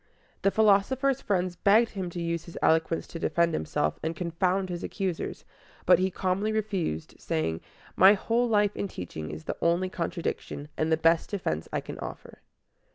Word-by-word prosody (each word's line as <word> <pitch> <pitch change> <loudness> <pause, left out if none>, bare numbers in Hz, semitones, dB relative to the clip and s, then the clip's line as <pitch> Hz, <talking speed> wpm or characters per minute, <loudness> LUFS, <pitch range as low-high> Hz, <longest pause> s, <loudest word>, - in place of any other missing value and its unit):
The 195 - +4
philosopher's 220 +7 +3
friends 185 -3 0
begged 220 +5 +4
him 190 -3 -4
to 175 - -6
use 170 -1 -2
his 170 - -10
eloquence 160 +1 +2
to 165 - -8
defend 170 0 +1
himself 75 - -1
and 160 +1 -2
confound 180 +2 0
his 175 -1 -4
accusers; 190 -5 -3 0.4
but 180 -1 +6
he 190 +1 +2
calmly 190 +3 -1
refused, 200 - -2
saying, 80 +1 -2 0.3
"My 190 +2 +8
whole 230 +4 +1
life 210 -2 +2
and 200 - -3
teaching 80 - -6
is 75 +1 -7
the - - -4
only 175 +2 +2
contradiction, 170 -4 -4
and 155 +1 0
the 160 - +4
best 165 +1 +3
defense 130 - -3
I - - -1
can - - -8
offer." - - -8
180 Hz, 170 wpm, -28 LUFS, 165-200 Hz, 0.4 s, My